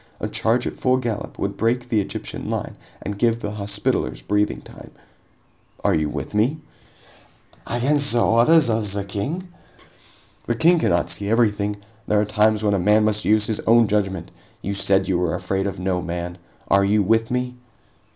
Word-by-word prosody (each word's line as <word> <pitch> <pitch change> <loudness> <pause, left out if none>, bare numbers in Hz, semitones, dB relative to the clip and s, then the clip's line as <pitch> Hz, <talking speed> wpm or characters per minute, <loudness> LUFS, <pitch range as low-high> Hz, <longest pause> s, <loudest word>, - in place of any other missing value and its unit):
A - - -2
charge 120 +3 0
at - - -4
full 130 0 +2
gallop 120 -5 -4
would 100 0 -2
break 120 +2 0
the 110 -3 +2
Egyptian - - -6
line - - -3 0.3
and 100 0 -5
give 115 0 +2
the 105 - -4
Hospitallers 100 - -2
breathing 105 +9 0
time. - - -13 0.9
Are - - +3
you 75 -1 +1
with 75 +3 -5
me?" 115 +9 +2 1.1
"Against 140 +4 +2
the 120 - +3
orders 125 +7 +5
of 110 -2 0
the 100 0 -2
King?" 145 - -4 1.0
"The 120 - 0
King 170 +7 +4
cannot 85 - +1
see 100 0 -2
everything! 105 -3 +1 0.3
There 105 - +3
are 105 - +2
times 105 +1 +2
when 105 -1 +2
a 100 - +1
man 105 +4 +4
must 105 0 0
use 105 0 +3
his 110 -1 -2
own 115 +1 +6
judgment! 95 -4 -1 0.3
You 100 - -2
said 95 -1 +1
you 90 -2 +1
were 90 -2 0
afraid 95 +2 -2
of 100 - -5
no 90 -1 -1
man. 85 +1 -5 0.3
Are 100 0 +4
you 105 +1 +3
with 115 +3 +2
me?" 125 0 -1
105 Hz, 180 wpm, -22 LUFS, 100-115 Hz, 1.1 s, own